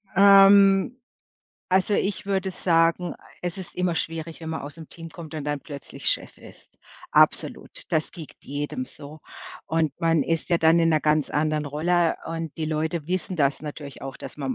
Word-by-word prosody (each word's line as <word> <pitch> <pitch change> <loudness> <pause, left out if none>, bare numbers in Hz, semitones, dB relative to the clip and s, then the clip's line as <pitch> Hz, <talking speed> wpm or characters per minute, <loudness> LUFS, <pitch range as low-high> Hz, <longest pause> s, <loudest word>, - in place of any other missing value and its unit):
Ähm, 195 +2 +7 0.7
also, 190 +2 +2
ich 200 0 0
würde 195 -1 -1
sagen, 170 0 +1 0.3
es 175 +1 -3
ist 185 - -8
immer 180 -1 0
schwierig, 165 0 -4
wenn 160 - -6
man 160 -2 -4
aus 145 +3 -8
dem 160 -2 -11
Team 165 -1 -10
kommt 160 -1 -10
und 150 - -4
dann 145 -1 -2
plötzlich 140 -2 -9
Chef - - -2
ist. - - -16 0.4
Absolut. - - +2 0.2
Das 155 0 0
geht 160 -4 -10
jedem 145 - -4
so. 150 - -11 0.5
Und 160 -3 0
man 165 -2 +3
ist 165 +3 -2
ja 170 - +3
dann 165 +1 +4
in 165 - +3
'ner 155 -2 +3
ganz 150 0 +2
anderen 150 0 0
Rolle 165 +4 +1
und 165 -1 -5
die 160 - -2
Leute 155 0 -2
wissen 185 0 -2
das 140 -3 +1
natürlich 145 -2 -8
auch, 135 -1 -7
dass - - -9
man 135 -2 -2
165 Hz, 180 wpm, -25 LUFS, 150-180 Hz, 0.7 s, Ähm